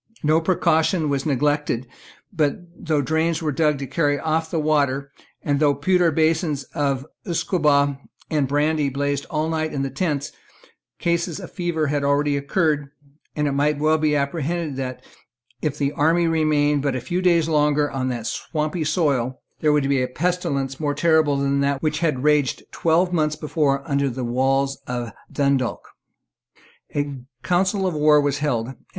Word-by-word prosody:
No 155 +2 +3
precaution 165 -1 +2
was 140 +1 -1
neglected; 145 -2 0 0.5
but, 150 -5 +1 0.3
though 150 -3 +2
drains 160 +3 0
were 155 - 0
dug 150 0 +1
to 140 - -5
carry 145 +2 +1
off 160 0 -1
the 165 - -2
water, 140 -3 +1 0.3
and 145 -1 0
though 145 -2 +3
pewter 175 +4 +2
basins 160 -2 +1
of 140 -2 -1 0.2
usquebaugh 150 -5 +1 0.3
and 150 -4 0
brandy 145 +1 +1
blazed 140 +1 -2
all 155 0 -1
night 160 -1 -1
in 140 -1 -2
the 135 - -3
tents, 145 -1 -2 0.7
cases 170 -1 -1
of - - -9
fever 175 -4 -1
had 145 0 -1
already 145 +1 +2
occurred, 145 0 0 0.5
and 150 -1 0
it - - 0
might 145 +2 +1
well 155 +2 +2
be 155 -1 +2
apprehended 150 +2 -2
that, 130 -1 -5 0.6
if 150 -3 -2
the 140 -1 0
army 165 +4 +2
remained 150 -3 +2
but 140 -2 -1
a - - -1
few 175 +9 -2
days 170 -3 +3
longer 150 -1 +2
on 130 -1 -2
that 120 -3 -4
swampy 155 +5 -2
soil, 140 -6 0 0.2
there 150 - +3
would 145 -2 +2
be 140 -2 +2
a 125 - 0
pestilence 140 -3 -2
more 145 -2 -1
terrible 160 -4 +3
than 140 0 +1
that 140 0 0
which 155 0 0
had 150 -6 0
raged 150 -3 +2
twelve 175 +2 +1
months 155 -2 +1
before 145 -3 -1
under 140 -1 +1
the 130 +1 -4
walls 135 +3 +1
of 120 -2 -3 0.2
Dundalk, 140 -3 0 1.1
A 145 -2 -2 0.2
council 185 +5 +1
of 185 - 0
war 150 0 +5
was 145 -1 0
held. 125 -4 -1
150 Hz, 165 wpm, -22 LUFS, 140-160 Hz, 1.1 s, war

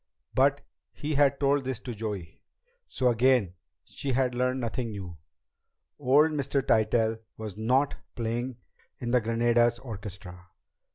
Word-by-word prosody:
But 140 +1 +3 0.3
he 150 +1 -3
had 140 -1 +3
told 140 0 +2
this 130 -3 -3
to 125 - -5
Joey, 105 -6 -6 0.5
so 125 -2 +1
again 120 -5 +3 0.3
she 135 -2 -4
had 125 0 +1
learned 125 +1 0
nothing 120 0 -2
new. 95 -5 -7 0.8
Old 145 +4 +4
Mr. 140 -2 0
Tytell 110 0 +2 0.2
was 110 -3 -6
not 130 +6 +1 0.2
playing 120 +2 -2 0.4
in 120 -1 -4
the 125 0 +4
Granada's 120 +1 +2
orchestra. 100 -6 -8
120 Hz, 130 wpm, -28 LUFS, 110-130 Hz, 0.8 s, Old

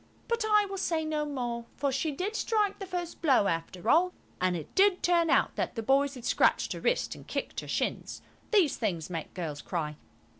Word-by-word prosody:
But 465 -1 0
I 420 -1 +5
will 390 -1 -5
say 325 -3 0
no 305 -1 -1
more: 240 -4 -3
for 280 0 0
she 275 +4 0
did 370 +9 -3
strike 425 -3 +1
the 390 - -6
first 350 -2 -5
blow, 270 -10 +4
after 170 +3 -3
all, 355 +7 +4 0.3
and 185 -1 +2
it 160 - -9
did 390 -1 +4
turn 340 -2 +3
out - - +3
that - - -2
the 225 - -3
boys 275 +4 +2
had 250 - -9
scratched - - +2
her - - -6
wrist - - +1
and - - -13
kicked - - -3
her - - -8
shins. - - -2 0.3
These 385 - +3
things 180 -7 -2
make 165 -3 -5
girls 155 -5 -4
cry. 155 -4 -3
290 Hz, 210 wpm, -29 LUFS, -, 0.3 s, I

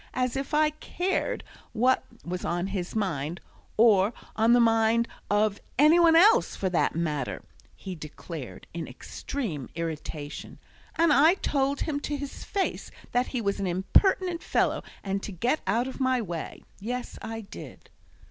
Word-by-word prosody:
As 255 -1 0
if 270 0 -3
I 305 0 +3
cared 370 +9 -2 0.3
what 250 +3 +3 0.2
was 180 +1 -4
on 175 +1 -1
his 190 -1 -4
mind, 170 -6 -1 0.4
or 215 -2 +5 0.2
on 225 +2 +4
the 245 - +6
mind 225 0 +3 0.2
of 205 0 +2 0.2
any 305 +5 +6
one 335 -1 +6
else, 430 +8 +6
for 190 - -1
that 170 - +1
matter," 150 -5 -2 0.3
he 190 - -7
declared, 155 -3 -8
in 165 -2 -4
extreme 155 - -5
irritation. 155 -2 -5 0.4
"And 330 -2 +4
I 315 +6 +6
told 280 -6 0
him 295 -3 -1
to 290 0 -3
his 285 -1 -7
face 395 -1 -2 0.2
that 245 +1 +1
he 250 - -2
was 200 -1 -1
an 195 - -1
impertinent 340 - +2
fellow, - - +1 0.2
and 195 0 -2
to 205 - -6
get 240 - 0
out 240 +3 +1
of 265 - -7
my 260 -1 +2
way. 175 -7 -5 0.2
Yes, 245 +4 -5
I 225 0 -5
did!" 200 - -11
225 Hz, 155 wpm, -27 LUFS, 180-280 Hz, 0.4 s, the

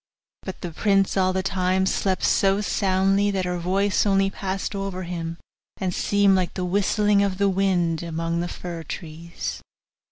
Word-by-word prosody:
But 190 - -7
the 175 - -5
prince 195 +3 +2
all 185 -1 +3
the 190 0 -1
time 190 -1 +1
slept 190 0 0
so 195 0 +3
soundly, 195 0 +2
that 190 -2 -1
her 180 0 -2
voice 190 +3 +1
only 195 -1 +2
passed 195 +1 -3
over 195 -2 -4
him, 170 -1 -5 0.4
and 185 -2 -2
seemed 200 0 +3
like 185 -2 -1
the 185 - -2
whistling 205 +2 +2
of 195 -2 0
the 200 0 +2
wind 180 -4 +1
among 165 0 -2
the 175 - -1
fir 175 -1 -6
trees. 165 +1 -6
190 Hz, 165 wpm, -24 LUFS, 175-195 Hz, 0.4 s, all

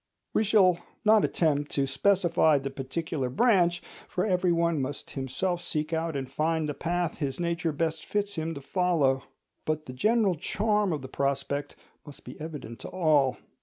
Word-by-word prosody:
We - - +3
shall 195 -5 +4 0.3
not 215 -1 +6
attempt 145 -3 +1
to 140 - +1
specify 165 +1 +3
the 135 0 -4
particular 135 +1 -3
branch—for 175 - +1
every 180 -3 +2
one 170 -3 +1
must 135 +2 -5
himself 145 +7 -2
seek 155 0 -3
out 160 -1 -1
and 135 -1 -3
find 155 +3 0
the 150 - -2
path 175 +2 -2
his 140 -2 -2
nature 170 -1 0
best 160 +1 -2
fits 205 -1 -2
him 160 0 -3
to 140 - -7
follow; 145 -4 +1 0.4
but 155 0 -2
the 125 - -8
general 215 - +2
charm 210 +4 0
of 150 -4 -3
the - - -5
prospect 140 +1 -2 0.3
must 145 -3 -13
be 125 - -8
evident 150 -8 -7
to - - -7
all. 155 -7 +2
160 Hz, 165 wpm, -28 LUFS, 140-180 Hz, 0.4 s, not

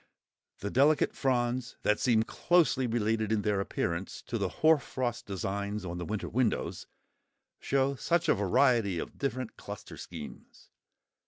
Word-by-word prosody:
The 100 +1 -3
delicate 145 +4 +4
fronds, 125 -1 0
that 105 - +2
seem 115 -4 +3
closely 155 -1 +2
related 110 -1 0
in 105 -2 +1
their 105 -2 +1
appearance 90 -1 -3
to 115 - -3
the 100 -2 0
hoarfrost 130 - +1
designs 100 +1 -3
on 90 0 -4
the 85 - -4
winter 105 +3 -3
windows, 120 -2 -1 0.7
show 135 0 +1
such 170 +5 0
a - - +6
variety 105 -1 +3
of - - -6
different 130 -3 -3
cluster - - -9
schemes. - - -10
115 Hz, 140 wpm, -30 LUFS, 100-130 Hz, 0.7 s, a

